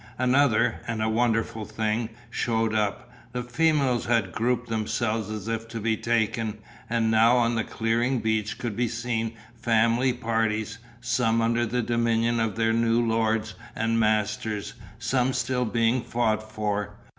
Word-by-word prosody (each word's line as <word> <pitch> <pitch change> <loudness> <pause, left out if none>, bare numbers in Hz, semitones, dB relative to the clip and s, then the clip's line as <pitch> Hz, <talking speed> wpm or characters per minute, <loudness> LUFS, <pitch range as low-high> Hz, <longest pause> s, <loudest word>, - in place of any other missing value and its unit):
Another, 125 -2 +3
and 115 -2 -2
a - - +1
wonderful 115 -1 0
thing, 110 +1 -2 0.2
shewed 115 -2 0
up: 105 +2 -1 0.2
the 125 0 -2
females 135 -1 +1
had 115 -6 +1
grouped 120 +4 0
themselves 110 -1 -1
as 110 -1 -5
if 115 0 -3
to 115 0 -6
be 110 +1 +1
taken, 110 -1 0 0.3
and 115 -1 +1
now 115 +3 +5
on 120 -1 +2
the 115 -1 0
clearing 115 +4 0
beach 110 -1 -1
could 115 -4 -4
be 120 +2 +1
seen 115 -1 -2 0.2
family 115 +2 +2
parties, 115 -3 -1 0.2
some 115 -1 +1
under 115 +1 +1
the 125 +2 -1
dominion 115 0 +1
of 110 -3 0
their 115 0 +2
new 115 0 +2
lords 115 -1 0 0.2
and 115 0 +1
masters, 110 -1 0 0.2
some 125 +2 0
still 125 +1 0
being 115 +2 +1
fought 110 -2 -1
for. 105 -2 -2
115 Hz, 150 wpm, -26 LUFS, 110-120 Hz, 0.3 s, now